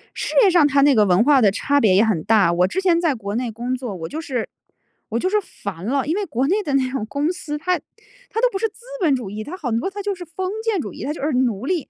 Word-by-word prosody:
事 -, -, -4 dB
业 400 Hz, -, +6 dB
上 340 Hz, -4 st, +5 dB
它 280 Hz, -1 st, +3 dB
那 280 Hz, -1 st, +5 dB
个 210 Hz, -2 st, +5 dB
文 185 Hz, +2 st, +4 dB
化 280 Hz, 0 st, +5 dB
的 205 Hz, -4 st, +5 dB
差 285 Hz, +8 st, +1 dB
别 210 Hz, -8 st, +4 dB
也 200 Hz, -, +5 dB
很 205 Hz, -9 st, 0 dB
大。 210 Hz, -5 st, +4 dB
我 180 Hz, +1 st, +3 dB
之 375 Hz, -, -2 dB
前 350 Hz, -3 st, +3 dB
在 320 Hz, -5 st, +1 dB
国 205 Hz, -3 st, -5 dB
内 240 Hz, 0 st, -2 dB
工 240 Hz, +3 st, -3 dB
作， 245 Hz, -6 st, -5 dB
我 165 Hz, -2 st, -6 dB
就 310 Hz, +3 st, -5 dB
是 255 Hz, -7 st, -3 dB, 0.6 s
我 230 Hz, +1 st, -1 dB
就 370 Hz, -, 0 dB
是 425 Hz, -, +2 dB
烦 195 Hz, -, -8 dB
了， 270 Hz, +4 st, 0 dB
因 320 Hz, -, 0 dB
为， 410 Hz, 0 st, -1 dB
国 270 Hz, -5 st, -1 dB
内 400 Hz, +7 st, +2 dB
的 290 Hz, -, -3 dB
那 260 Hz, -1 st, +1 dB
种 265 Hz, -5 st, -3 dB
公 290 Hz, +7 st, -1 dB
司， 300 Hz, -4 st, -5 dB
它 360 Hz, +4 st, 0 dB, 0.5 s
它 450 Hz, -, -2 dB
都 -, -, +4 dB
不 390 Hz, -, -2 dB
是 450 Hz, -, +1 dB
"资 425 Hz, -, -20 dB, 0.2 s
本 310 Hz, -6 st, +3 dB
主 240 Hz, -6 st, -5 dB
义"， 210 Hz, +2 st, -6 dB
它 360 Hz, +5 st, -7 dB
很 240 Hz, -9 st, -1 dB
多 380 Hz, -, -2 dB
它 405 Hz, +1 st, -6 dB
就 405 Hz, 0 st, -2 dB
是 355 Hz, -1 st, -9 dB
"封 370 Hz, +3 st, -4 dB
建 445 Hz, -4 st, 0 dB
主 -, -, -7 dB
义"， -, -, -8 dB
它 295 Hz, -, -2 dB
就 -, -, -9 dB
是 295 Hz, +3 st, 0 dB
奴 250 Hz, -3 st, 0 dB
隶 335 Hz, -2 st, -2 dB
275 Hz, 320 characters per minute, -21 LUFS, 225-350 Hz, 0.6 s, 业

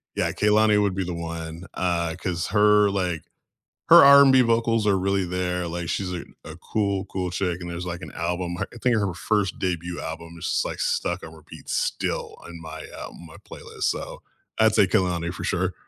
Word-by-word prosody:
yeah, -, -, 0 dB
Kehlani 105 Hz, 0 st, +3 dB
would 100 Hz, -2 st, 0 dB
be 95 Hz, -, -1 dB
the 90 Hz, 0 st, -4 dB
one, 85 Hz, 0 st, -6 dB
uh, 85 Hz, -2 st, -1 dB
'cause 90 Hz, -2 st, -3 dB
her, 105 Hz, 0 st, +4 dB
like 90 Hz, -4 st, -2 dB, 0.6 s
her -, -, +9 dB
R&B 140 Hz, -1 st, +8 dB
vocals 115 Hz, -2 st, +2 dB
are 100 Hz, -2 st, +3 dB
really 95 Hz, 0 st, 0 dB
there, 90 Hz, 0 st, -2 dB
like, 85 Hz, 0 st, -4 dB
she's 90 Hz, 0 st, -2 dB
a 85 Hz, -, -5 dB, 0.2 s
a 80 Hz, -, -9 dB
cool, 100 Hz, +1 st, -2 dB
cool 90 Hz, -1 st, -3 dB
chick, 90 Hz, -1 st, -2 dB
and 85 Hz, -, -6 dB
there's, 85 Hz, +1 st, -5 dB
like, 90 Hz, -1 st, -5 dB
an -, -, -8 dB
album 85 Hz, +1 st, -3 dB
her -, -, -3 dB
I 120 Hz, -, -11 dB
think 125 Hz, +1 st, +2 dB
her 100 Hz, -4 st, 0 dB
first 100 Hz, +2 st, -1 dB
debut 90 Hz, -1 st, -3 dB
album 85 Hz, +1 st, -7 dB
is -, -, -9 dB
just, -, -, 0 dB
like, -, -, -5 dB
stuck 90 Hz, +2 st, -1 dB
on 80 Hz, 0 st, -10 dB
repeat 80 Hz, -2 st, -14 dB
still -, -, -2 dB
on 85 Hz, -1 st, -10 dB
my, 80 Hz, -, -8 dB, 0.2 s
um -, -, -7 dB
on 85 Hz, -, -11 dB
my 80 Hz, -, -13 dB
playlist, -, -, -12 dB
so, -, -, -3 dB, 0.4 s
I'd 110 Hz, -1 st, +4 dB
say 100 Hz, -, +5 dB
Kehlani, 90 Hz, -4 st, 0 dB
for -, -, -7 dB
sure. 95 Hz, +1 st, -1 dB
90 Hz, 205 wpm, -24 LUFS, 85-105 Hz, 0.6 s, her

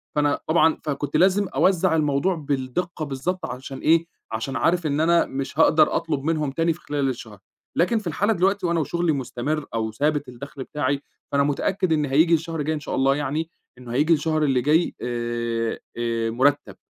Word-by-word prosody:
فأنا 145 Hz, -1 st, +2 dB
طبعًا 160 Hz, 0 st, +4 dB
فكنت 145 Hz, -1 st, -2 dB
لازم 195 Hz, +2 st, +3 dB
أوزَّع 185 Hz, -2 st, +2 dB
الموضوع 150 Hz, +4 st, +1 dB
بالدِقّة 150 Hz, +3 st, -3 dB
بالضبط 160 Hz, +6 st, -3 dB
عشان 135 Hz, -2 st, -7 dB
إيه، 165 Hz, +1 st, +3 dB, 0.3 s
عشان 115 Hz, +4 st, -3 dB
عارف 170 Hz, 0 st, +1 dB
إن 145 Hz, 0 st, 0 dB
أنا 170 Hz, +1 st, +4 dB
مش 135 Hz, +3 st, -5 dB
هاقدر 155 Hz, -1 st, +5 dB
أطلب 155 Hz, -4 st, -1 dB
منهم 155 Hz, -2 st, 0 dB
تاني 165 Hz, +4 st, +1 dB
في 165 Hz, -, -15 dB
خلال 145 Hz, -2 st, -1 dB
الشهر. 110 Hz, -5 st, -7 dB, 0.4 s
لكن 225 Hz, +7 st, +3 dB
في 210 Hz, -, -7 dB
الحالة 200 Hz, +7 st, +1 dB
دلوقتي 195 Hz, +1 st, +1 dB
وأنا 170 Hz, -1 st, +1 dB
وشغلي 170 Hz, +2 st, 0 dB
مُستَمر 140 Hz, +2 st, -2 dB
أو 110 Hz, -1 st, -1 dB
ثابت 145 Hz, +4 st, 0 dB
الدخل 135 Hz, +2 st, -8 dB
بتاعي، 140 Hz, -1 st, -2 dB, 0.3 s
فأنا 140 Hz, 0 st, +3 dB
مُتأكد 170 Hz, +5 st, 0 dB
إن 150 Hz, -1 st, +1 dB
هييجي 155 Hz, +5 st, +3 dB
الشهر 165 Hz, 0 st, 0 dB
الجاي 155 Hz, +2 st, -1 dB
إن -, -, -4 dB
شاء -, -, -4 dB
الله 135 Hz, +1 st, +3 dB
يعني، 150 Hz, +3 st, -2 dB, 0.3 s
إنه 125 Hz, -1 st, -10 dB
هييجي 150 Hz, +6 st, +3 dB
الشهر 155 Hz, 0 st, +1 dB
اللي 135 Hz, -4 st, +2 dB
جاي 155 Hz, +6 st, +2 dB
آآ 120 Hz, -1 st, -2 dB, 0.2 s
آآ 115 Hz, -1 st, -1 dB
مُرتَّب. 135 Hz, +5 st, +1 dB
150 Hz, 180 wpm, -23 LUFS, 135-165 Hz, 0.4 s, هاقدر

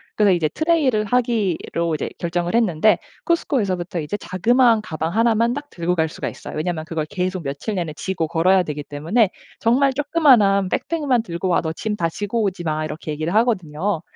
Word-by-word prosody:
그래서 205 Hz, -2 st, +4 dB
이제 160 Hz, -4 st, +1 dB
트레일을 290 Hz, -, +1 dB
하기로 205 Hz, -8 st, 0 dB
이제 150 Hz, -, -3 dB
결정을 175 Hz, +3 st, -2 dB
했는데 215 Hz, -3 st, +3 dB, 0.3 s
쿠스코에서부터 195 Hz, -, 0 dB
이제 150 Hz, +7 st, -3 dB
자그마한 225 Hz, +5 st, +3 dB
가방 160 Hz, -3 st, -4 dB
1 230 Hz, +1 st, +3 dB
만 235 Hz, +2 st, +2 dB
딱 290 Hz, +1 st, -6 dB
들고 175 Hz, +1 st, -1 dB
갈 160 Hz, -2 st, +1 dB
수가 170 Hz, -, -5 dB
있어요. -, -, -8 dB
왜냐하면 160 Hz, 0 st, -2 dB
그걸 160 Hz, -2 st, -3 dB
계속 185 Hz, -1 st, -3 dB
며칠 140 Hz, +10 st, -4 dB
내내 170 Hz, -5 st, -3 dB
지고 180 Hz, -2 st, -2 dB
걸어야 180 Hz, +3 st, +3 dB
되기 150 Hz, -3 st, -5 dB
때문에 165 Hz, +11 st, +1 dB, 0.3 s
"정말 265 Hz, +4 st, +3 dB
쪼끄만한 255 Hz, -, +4 dB
백팩 330 Hz, -3 st, -2 dB
만 250 Hz, -4 st, +3 dB
들고 170 Hz, -3 st, -4 dB
와. 175 Hz, -, +3 dB
너 160 Hz, -1 st, -3 dB
짐 210 Hz, +6 st, -3 dB
다 165 Hz, -4 st, 0 dB
지고 205 Hz, +6 st, -2 dB
오지 185 Hz, -3 st, -2 dB
마." 155 Hz, -1 st, -1 dB
이렇게 155 Hz, 0 st, -5 dB
얘기를 155 Hz, +3 st, -3 dB
하거든요. 195 Hz, -6 st, 0 dB
185 Hz, 410 characters per minute, -21 LUFS, 165-230 Hz, 0.3 s, 그래서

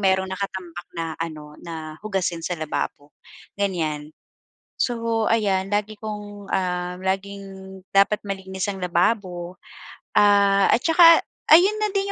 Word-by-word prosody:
mayro'n 190 Hz, -1 st, +2 dB
nakatambak 185 Hz, -3 st, -5 dB
na 165 Hz, -1 st, -3 dB
ano, 150 Hz, -2 st, -7 dB
na 155 Hz, -2 st, -8 dB
hugasin 185 Hz, -5 st, -1 dB
sa 175 Hz, -, -1 dB
lababo, 150 Hz, -1 st, -4 dB, 0.5 s
ganyan. 155 Hz, -6 st, -2 dB, 0.7 s
So, 230 Hz, -2 st, 0 dB
ayan 195 Hz, -4 st, +1 dB
lagi 210 Hz, +1 st, -1 dB
kong, 205 Hz, -2 st, -7 dB
ah, 180 Hz, -1 st, -1 dB
laging 195 Hz, +1 st, -2 dB, 0.5 s
dapat 200 Hz, +2 st, +3 dB
malinis 190 Hz, -1 st, -5 dB
ang 195 Hz, -, -8 dB
lababo, 180 Hz, -1 st, 0 dB, 0.6 s
ah, 200 Hz, -1 st, +5 dB
at 240 Hz, -, +3 dB
saka 330 Hz, 0 st, +7 dB, 0.3 s
ayun 380 Hz, +7 st, +7 dB
na 425 Hz, -, +2 dB
din 395 Hz, 0 st, 0 dB
195 Hz, 125 wpm, -23 LUFS, 175-210 Hz, 0.7 s, saka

